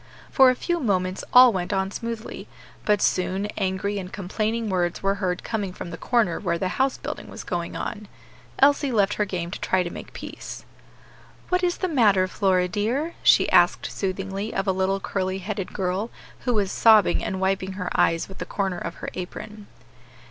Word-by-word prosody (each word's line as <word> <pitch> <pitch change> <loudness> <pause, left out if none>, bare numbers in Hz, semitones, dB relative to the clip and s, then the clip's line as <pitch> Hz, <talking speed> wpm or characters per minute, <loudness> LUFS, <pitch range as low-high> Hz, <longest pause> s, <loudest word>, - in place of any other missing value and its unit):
For 265 -1 +7
a 255 - +2
few 345 +6 -1
moments 185 - 0
all 250 -1 +8
went 180 0 -2
on 190 -1 0
smoothly; 230 0 -6 0.4
but 210 -2 +3
soon 185 +2 +1
angry 200 +1 -1
and 185 -1 -7
complaining 215 +4 -2
words 180 -3 -1
were 195 0 +3
heard 180 -2 -1
coming 205 -4 -2
from 175 - -7
the - - -5
corner 230 -9 +1
where 170 -4 -1
the 185 +2 -1
house 265 +7 0
building - - -6
was - - -8
going 170 -1 -3
on. 210 -2 -5 0.5
Elsie 280 0 +4
left 205 -3 +2
her 210 - 0
game 175 -3 -4
to - - -5
try 185 -1 +2
to 175 - -5
make - - -9
peace. - - -8 0.8
"What 360 0 +2
is 350 -1 +1
the 370 - -1
matter, 210 - +3
Flora, 185 -1 +1
dear?" 235 - -1
she - - +5
asked - - +4
soothingly 195 +2 -3
of 195 - 0
a 190 - +2
little 190 +1 0
curly 190 -1 -2
headed 195 0 -4
girl, 190 +3 -2 0.4
who 245 -2 +1
was 200 -2 +1
sobbing, 220 -4 +5
and 190 - -3
wiping 190 0 0
her 180 -1 -4
eyes 165 0 +2
with 190 - -12
the - - -4
corner 190 -3 -2
of - - -5
her - - -3
apron. 205 +3 -7
195 Hz, 190 wpm, -24 LUFS, 185-220 Hz, 0.8 s, all